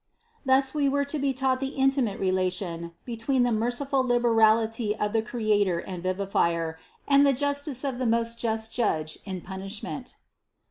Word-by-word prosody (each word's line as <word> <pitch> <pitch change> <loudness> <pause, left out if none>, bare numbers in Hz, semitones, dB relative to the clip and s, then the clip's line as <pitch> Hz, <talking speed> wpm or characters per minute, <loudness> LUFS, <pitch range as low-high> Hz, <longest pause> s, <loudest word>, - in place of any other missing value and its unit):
Thus 265 0 +3
we 290 -2 +2
were 280 +1 +1
to 290 +2 -2
be 275 0 +1
taught 260 0 0
the 270 0 -4
inti 270 +1 +3
mate 205 -4 -3
relation 185 -3 -1
between 245 +2 0
the 245 - +2
merciful 245 +5 0
liberality 225 -2 +3
of 210 0 -2
the 225 - +3
Cre 220 +2 -8
ator 205 -5 +2
and 180 -2 -6
Vivifier 170 -4 0 0.3
and 280 0 +6
the 280 -1 +4
justice 285 0 -1
of 265 -3 -2
the 255 - 0
most 230 0 0
just 225 -1 -2
Judge 155 -10 -1
in 190 -3 -5
punishment. 195 +7 -7
230 Hz, 170 wpm, -26 LUFS, 195-265 Hz, 0.3 s, and